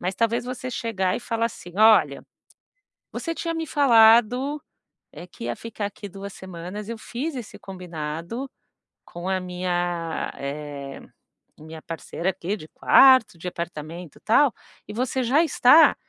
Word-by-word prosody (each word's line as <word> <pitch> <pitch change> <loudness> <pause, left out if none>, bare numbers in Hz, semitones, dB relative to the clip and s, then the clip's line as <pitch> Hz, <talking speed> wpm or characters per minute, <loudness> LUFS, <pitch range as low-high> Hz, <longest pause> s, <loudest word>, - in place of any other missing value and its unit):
Mas 180 +2 -2
talvez 230 +2 0
você 255 0 -5
chegar 190 -6 -1
e - - -5
falar 230 -1 -1
assim: 175 -6 -10
"Olha, 220 0 +5 0.9
você 330 -1 -4
tinha 335 0 -3
me 325 -1 -3
falado, 245 +2 +4 0.5
eh, 175 - -9
que 115 - -9
ia 120 - -2
ficar 215 -3 -5
aqui 205 0 -9
2 200 +1 -8
semanas, 185 +4 -8
eu 230 - -4
fiz 270 +7 -5
esse 240 -5 -8
combinado 175 - -6 0.6
com 175 +2 -8
a 190 -1 +1
minha 175 -2 -2
eh, 140 -1 -6 0.6
minha 155 +1 -11
parceira 170 +2 -3
aqui 190 +3 -4
de 155 - -11
quarto, 260 -8 +5
de 180 - -9
apartamento, 170 -1 -7
tal, 250 +3 +4 0.4
e - - -6
você 255 +3 -1
já 275 +8 +3
está 310 0 +6
200 Hz, 145 wpm, -24 LUFS, 175-240 Hz, 0.9 s, está